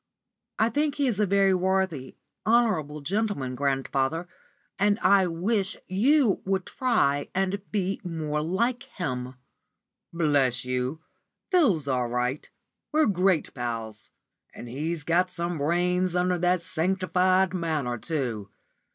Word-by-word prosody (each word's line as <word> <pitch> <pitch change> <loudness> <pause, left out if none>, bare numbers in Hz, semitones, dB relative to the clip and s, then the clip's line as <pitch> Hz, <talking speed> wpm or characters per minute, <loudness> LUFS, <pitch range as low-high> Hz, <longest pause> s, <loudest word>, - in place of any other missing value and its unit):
"I 220 - +3
think 295 +4 0
he 285 - 0
is 230 -6 0
a 210 - +3
very 195 0 +4
worthy, 185 -7 0 0.3
honourable 200 -11 +1
gentleman, 190 - -1
grandfather, 135 +4 -1 0.5
and 205 +1 +3
I 190 -1 +5
wish 190 +4 -1
you 235 +4 +3
would 190 -1 -1
try 215 - +1
and 190 +1 0
be 195 -1 -1
more 155 -4 -2
like 235 +10 0
him." 130 -7 -5 0.8
"Bless 140 -7 +1
you, 125 +5 -2 0.5
Phil's 220 - +3
all 125 -2 0
right. 125 +3 -2 0.4
We're 310 0 +3
great 185 -4 +1
pals. 115 -4 -5 0.5
And 120 - -8
he's 155 +6 -3
got 175 +4 +2
some 170 -2 -3
brains 180 +4 +1
under 180 0 +1
that 180 0 +1
sanctified 185 +1 +1
manner, 155 -9 -2
too. 120 -9 -3
175 Hz, 125 wpm, -26 LUFS, 140-195 Hz, 0.8 s, I